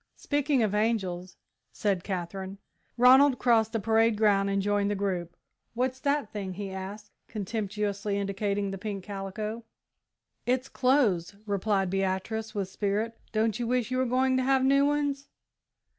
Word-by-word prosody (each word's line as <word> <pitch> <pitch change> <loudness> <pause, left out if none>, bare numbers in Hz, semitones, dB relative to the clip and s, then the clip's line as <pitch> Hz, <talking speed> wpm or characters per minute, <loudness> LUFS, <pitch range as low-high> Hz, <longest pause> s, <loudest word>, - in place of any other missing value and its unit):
"Speaking 285 -3 +1
of 210 -2 0
angels 195 -5 -1 0.2
" - - -54
said 195 -4 -1
Katherine. 190 +1 -4 0.4
Ronald 260 +2 +7
crossed 225 -3 +3
the 225 - -1
parade 225 +1 +3
ground 200 -2 +3
and 200 0 +1
joined 205 0 +1
the 205 - 0
group. 185 -4 -3 0.4
"What's 255 +2 -1
that 280 -4 -1
thing?" 195 -3 -4
he 200 0 -5
asked, 200 +2 -7 0.2
contemptuously 210 -1 -2
indicating 200 0 -1
the 195 - -6
pink 200 -2 -5
calico. 210 +3 -5 0.8
"It's 255 +1 0
clothes," 230 -10 +2
replied 200 -2 0
Beatrice, 195 +3 -2
with 200 -2 -1
spirit; 210 +4 -2 0.2
"don't 220 0 0
you 240 - -1
wish 250 0 0
you 255 - 0
were 260 - +1
going 260 +1 +2
to 260 - +1
have 265 0 +3
new 275 +1 +4
ones?" 285 -1 -1
210 Hz, 155 wpm, -28 LUFS, 195-245 Hz, 0.8 s, Ronald